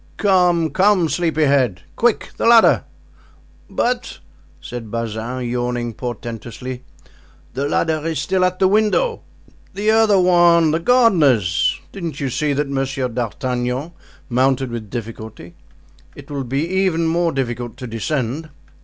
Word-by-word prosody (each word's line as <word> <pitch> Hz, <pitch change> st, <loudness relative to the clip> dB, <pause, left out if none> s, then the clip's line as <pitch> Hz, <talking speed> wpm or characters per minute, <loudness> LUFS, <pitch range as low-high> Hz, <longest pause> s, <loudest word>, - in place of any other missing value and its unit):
"Come, 180 Hz, -5 st, +2 dB
come, 190 Hz, -4 st, +3 dB
sleepy 160 Hz, -2 st, 0 dB
head; 130 Hz, -11 st, +2 dB
quick, 235 Hz, -2 st, +1 dB
the -, -, 0 dB
ladder!" 230 Hz, -1 st, +6 dB, 0.8 s
"But," 245 Hz, 0 st, -2 dB, 0.4 s
said 120 Hz, -3 st, -8 dB
Bazin, 115 Hz, +2 st, -4 dB
yawning 120 Hz, -1 st, -2 dB
portentously, 120 Hz, +1 st, -6 dB, 0.7 s
"the 140 Hz, +3 st, -2 dB
ladder 160 Hz, -2 st, 0 dB
is 160 Hz, -2 st, -2 dB
still 185 Hz, +5 st, 0 dB
at 185 Hz, 0 st, +1 dB
the 190 Hz, -, +3 dB
window." 215 Hz, -, +1 dB, 0.5 s
"The 210 Hz, +2 st, +1 dB
other 220 Hz, -3 st, +4 dB
one, 175 Hz, -3 st, +4 dB
the 160 Hz, -, +1 dB
gardener's. 150 Hz, -, +3 dB
Didn't 170 Hz, -7 st, -6 dB
you 135 Hz, -2 st, -2 dB
see 150 Hz, +3 st, 0 dB
that 145 Hz, +1 st, -1 dB
Monsieur 135 Hz, -1 st, -2 dB
d'Artagnan 125 Hz, +4 st, -3 dB, 0.4 s
mounted 130 Hz, 0 st, +1 dB
with 115 Hz, -3 st, -6 dB
difficulty? 110 Hz, -6 st, -8 dB, 0.6 s
It -, -, -12 dB
will 140 Hz, -2 st, -3 dB
be 135 Hz, +5 st, -1 dB
even 185 Hz, -3 st, +1 dB
more 170 Hz, +1 st, +1 dB
difficult 120 Hz, -4 st, -4 dB
to 125 Hz, -, -7 dB
descend." 130 Hz, +5 st, -3 dB
140 Hz, 130 wpm, -19 LUFS, 120-175 Hz, 0.8 s, ladder